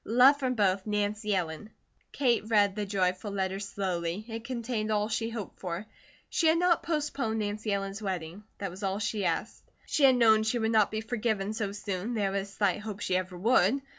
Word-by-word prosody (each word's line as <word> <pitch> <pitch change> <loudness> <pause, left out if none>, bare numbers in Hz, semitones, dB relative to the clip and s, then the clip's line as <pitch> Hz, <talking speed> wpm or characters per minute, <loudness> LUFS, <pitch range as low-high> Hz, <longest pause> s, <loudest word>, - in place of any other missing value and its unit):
Love 250 +5 +6
from 255 -2 0
both, 195 -3 +2
NANCY 210 0 0
ELLEN. 170 +2 -3 0.4
Kate 245 -4 +2
read 205 -3 +3
the 210 -1 -3
joyful 190 0 0
letter 190 -1 -2
slowly. 190 -1 -3
It 225 -1 -6
contained 235 -3 -3
all 210 0 +1
she 225 +1 -1
hoped 225 -4 -7
for. 180 +2 -4 0.4
She 330 - +1
had 320 +1 +5
not 355 0 +3
postponed 285 -8 -1
Nancy 210 0 -2
Ellen's 195 +1 -2
wedding. 185 -1 -4
That 195 -2 -4
was 185 +3 -10
all 195 -1 -1
she 205 -1 -1
asked. - - -2 0.2
She 290 - +3
had 260 -1 +6
known 220 -3 +5
she 220 +3 0
would 220 -1 0
not 215 -2 +4
be 215 0 -3
forgiven 220 -3 -1
so 215 -3 -2
soon, 200 +2 -4
there 200 -3 0
was 195 0 -3
slight 200 -1 +1
hope 210 -1 -6
she 185 -2 -1
ever 185 0 -2
would. 225 +4 +3
210 Hz, 195 wpm, -29 LUFS, 195-225 Hz, 0.4 s, Love